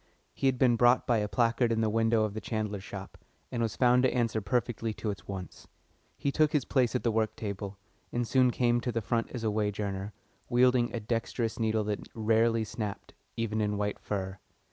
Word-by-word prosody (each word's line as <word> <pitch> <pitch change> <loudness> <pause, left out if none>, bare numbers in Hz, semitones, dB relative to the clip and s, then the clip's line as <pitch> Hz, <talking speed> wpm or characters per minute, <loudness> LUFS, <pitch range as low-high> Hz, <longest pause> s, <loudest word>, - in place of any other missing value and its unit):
He 135 - 0
had 130 -1 +2
been 125 -2 +4
brought 120 +2 +5
by 120 -3 +2
a 105 - -1
placard 115 +1 +2
in 115 0 +1
the 110 - +2
window 115 0 +3
of 105 -2 -1
the 110 - -5
chandler's 105 -3 -3
shop, 95 -1 -8 0.3
and 120 - -2
was 115 -3 -1
found 125 0 +4
to 130 - +3
answer 115 -3 0
perfectly 115 +1 -1
to 110 - -2
its 100 - -9
wants. 95 -3 -7 0.5
He 140 - 0
took 155 +2 +2
his 145 -5 +2
place 130 -3 +1
at 125 - 0
the 115 - +2
work 110 0 0
table, 100 -1 -5 0.3
and 120 -1 -1
soon 130 0 +4
came 120 -1 +2
to 125 - -2
the 115 - -1
front 115 +3 -1
as 120 -3 -6
a 110 - +1
wage 105 -1 -1
earner, 100 0 -3 0.4
wielding 125 0 +4
a 120 - -3
dexterous 115 +1 -2
needle 110 -1 +1
that 105 -1 -3
rarely 115 +1 +2
snapped, 105 -1 -5 0.2
even 110 -1 -1
in 105 -1 0
white 105 0 -2
fur. 95 -2 -4
115 Hz, 210 wpm, -30 LUFS, 105-120 Hz, 0.5 s, brought